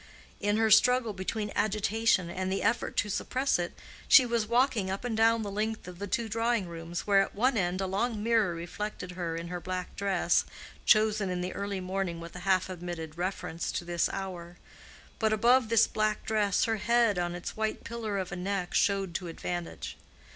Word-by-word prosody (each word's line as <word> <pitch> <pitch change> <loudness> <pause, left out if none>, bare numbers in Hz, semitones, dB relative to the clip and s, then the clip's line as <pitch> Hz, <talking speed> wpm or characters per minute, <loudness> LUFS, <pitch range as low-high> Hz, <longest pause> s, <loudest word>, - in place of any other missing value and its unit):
In 205 +1 +1
her 220 -1 +2
struggle 240 +1 +5
between 205 +2 -3
agitation 215 -2 +2
and 185 +1 -2
the 195 - -1
effort 225 - 0
to 205 - +2
suppress 255 +4 0
it, 175 -1 -4 0.3
she 260 - +8
was 235 -2 0
walking 235 -4 +2
up 195 +5 -3
and 235 -2 -1
down 225 0 +3
the 200 - -4
length 215 0 -3
of 180 -1 -9
the 200 - -4
two 225 +4 -1
drawing 225 -2 0
rooms, 170 +2 -5
where 200 -1 +5
at - - -3
one 250 +5 +2
end 185 -2 0
a - - 0
long 210 +3 -1
mirror 220 -6 +2
reflected 180 +2 -5
her 175 -2 -3
in 170 +1 -5
her 180 0 -4
black 185 +1 -5
dress, 190 -3 +2 0.4
chosen 215 -2 +4
in 180 -1 -2
the 180 +1 -3
early 200 -1 -3
morning 185 -2 -3
with 170 +1 -9
a - - -6
half 185 -1 +3
admitted 175 -4 -6
reference 180 -2 -3
to 175 - -3
this 175 -1 0
hour. 175 -3 -6 0.6
But 220 -1 +2
above 235 +2 +4
this 230 -1 +5
black 215 0 -1
dress 210 -3 +2
her 225 -1 +1
head 230 -3 +2
on 175 0 -1
its 175 - -6
white 220 0 -2
pillar 225 -3 -4
of 185 -2 -3
a - - -3
neck 185 0 -3
showed 195 -3 +1
to 175 +1 -3
advantage. 175 +1 -5
195 Hz, 200 wpm, -29 LUFS, 180-220 Hz, 0.6 s, she